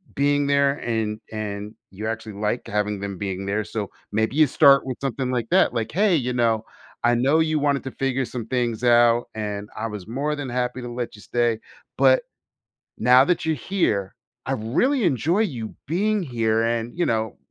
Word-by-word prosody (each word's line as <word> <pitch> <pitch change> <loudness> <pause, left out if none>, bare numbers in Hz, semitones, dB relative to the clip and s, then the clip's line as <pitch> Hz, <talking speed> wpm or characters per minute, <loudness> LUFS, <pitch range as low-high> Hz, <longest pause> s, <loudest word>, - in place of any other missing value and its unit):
being 145 +1 +2
there, 140 -1 +3
and 110 -2 -2
and 105 0 -5 0.2
you 105 +3 -7
actually 110 -1 -4
like 105 +4 -2
having 105 -1 -1
them 100 -2 -5
being 95 -1 -4
there 105 +2 -1
so, 105 -1 -4 0.2
maybe 110 +5 0
you 155 - +6
start 140 0 +5
with 130 -2 -4
something 130 -1 -2
like 120 -2 -1
that, - - +4
like, 115 -2 -2
hey 195 0 +3
you 125 -4 0
know, 115 -2 +1 0.4
I 120 +1 +4
know 135 +6 +3
you 155 -1 +1
wanted 140 -1 +1
to 130 - -4
figure 135 -1 -1
some 120 -2 -6
things 120 -2 -1
out, 120 0 +4
and 105 -1 -4
I 115 +1 -2
was 105 -3 -7
more 145 +6 -2
than 145 -3 -5
happy 125 +1 -2
to 120 - -6
let 120 -2 -4
you 105 - -14
stay, 120 -1 0 0.4
but - - +5 0.7
now 125 +1 +6
that 175 -1 0
you're 160 -1 +1
here, 110 - -1 0.3
I - - -3
really 235 - +1
enjoy 165 - +1
you 120 - -3
being 205 +6 +1
here 115 -5 0
and, 115 0 -1
you 175 - +2
know, 110 -1 -1
120 Hz, 190 wpm, -23 LUFS, 110-140 Hz, 0.7 s, you